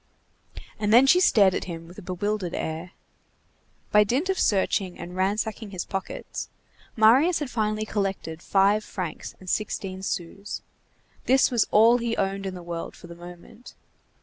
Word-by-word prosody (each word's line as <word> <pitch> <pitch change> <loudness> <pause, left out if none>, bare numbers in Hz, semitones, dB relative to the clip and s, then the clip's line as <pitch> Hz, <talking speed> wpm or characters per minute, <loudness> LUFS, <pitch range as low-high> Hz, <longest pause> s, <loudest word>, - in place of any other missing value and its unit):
And 210 -1 0
then 245 +4 +7
she 355 +7 +6
stared 200 - +5
at - - -2
him 165 -2 -7
with 180 +4 -12
a - - -10
bewildered 185 0 -3
air. 160 +3 -4 1.0
By 210 0 +6
dint 260 - -1
of 380 - 0
searching 190 -2 +1
and 175 +1 -8
ransacking 210 +3 -1
his 185 -3 -5
pockets, 195 -1 -5 0.5
Marius 260 +11 +5
had 295 -5 -4
finally 215 -1 -1
collected 195 -6 -3
five 200 +3 +3
francs 180 -7 -6
sixteen 190 -1 -3
sous. 190 +2 -5 0.6
This 260 +1 +4
was 235 -3 +2
all 230 +3 +5
he 230 -1 -2
owned 195 0 -1
in 185 - -5
the 180 - -9
world 170 -1 -6
for - - -14
the 170 - -10
moment. 175 +7 -13
200 Hz, 155 wpm, -25 LUFS, 180-220 Hz, 1.0 s, then